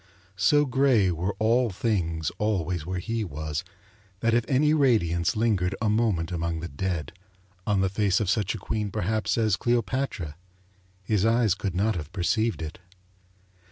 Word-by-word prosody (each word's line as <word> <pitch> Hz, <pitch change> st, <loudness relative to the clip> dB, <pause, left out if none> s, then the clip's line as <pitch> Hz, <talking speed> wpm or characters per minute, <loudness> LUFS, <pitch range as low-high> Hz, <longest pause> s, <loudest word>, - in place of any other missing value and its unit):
So 145 Hz, +11 st, +4 dB
grey 130 Hz, -7 st, +3 dB
were 90 Hz, +4 st, -2 dB
all 115 Hz, +3 st, +2 dB
things 90 Hz, -6 st, -1 dB
always 90 Hz, -6 st, -1 dB
where 95 Hz, 0 st, -2 dB
he 115 Hz, +5 st, -2 dB
was 75 Hz, -1 st, -4 dB, 0.6 s
that 115 Hz, 0 st, +2 dB
if 120 Hz, 0 st, +3 dB
any 150 Hz, +3 st, +3 dB
radiance 105 Hz, -, +2 dB
lingered 100 Hz, -5 st, +1 dB
a 110 Hz, -, +1 dB
moment 105 Hz, -7 st, +1 dB
among 85 Hz, -1 st, -2 dB
the 85 Hz, -, -5 dB
dead, 85 Hz, 0 st, -3 dB, 0.6 s
on 100 Hz, -2 st, +2 dB
the 95 Hz, -, +3 dB
face 100 Hz, +1 st, +1 dB
of 105 Hz, -, -1 dB
such 105 Hz, +1 st, 0 dB
a -, -, -4 dB
queen 105 Hz, -2 st, -3 dB
perhaps 105 Hz, +5 st, -1 dB
as 110 Hz, -4 st, +2 dB
Cleopatra, 120 Hz, -, -1 dB, 0.7 s
his 100 Hz, 0 st, +1 dB
eyes 115 Hz, -2 st, +3 dB
could 95 Hz, -2 st, -4 dB
not 105 Hz, +3 st, +1 dB
have 75 Hz, -1 st, -6 dB
perceived 110 Hz, +1 st, 0 dB
it. 80 Hz, +2 st, -7 dB
100 Hz, 160 wpm, -26 LUFS, 85-115 Hz, 0.7 s, So